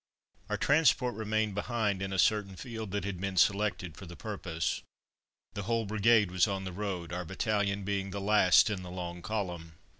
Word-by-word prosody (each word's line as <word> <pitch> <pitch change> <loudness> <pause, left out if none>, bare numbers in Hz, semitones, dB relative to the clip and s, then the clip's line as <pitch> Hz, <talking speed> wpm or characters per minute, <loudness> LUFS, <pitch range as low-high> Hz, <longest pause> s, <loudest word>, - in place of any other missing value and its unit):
Our - - 0
transport 140 -4 +3
remained 110 0 -1
behind 105 -2 -1
in 95 0 -3
a 95 - -2
certain 100 -1 +2
field 110 0 -6
that 100 +1 -2
had 95 -2 -4
been 100 -1 -3
selected 95 -4 +2
for 95 - -10
the 85 - -9
purpose. 90 -6 -3 0.7
The 100 - -4
whole 115 -1 +1
brigade 105 -1 +3
was 95 +3 +3
on 95 -1 -2
the 95 -1 -5
road, 90 -4 -4
our 90 +1 -2
battalion 100 +2 -1
being 100 0 -2
the 100 +1 -4
last 105 0 +5
in 100 -3 -3
the 90 - -8
long 90 -1 -6
column. 90 -6 -4
100 Hz, 185 wpm, -31 LUFS, 90-110 Hz, 0.7 s, last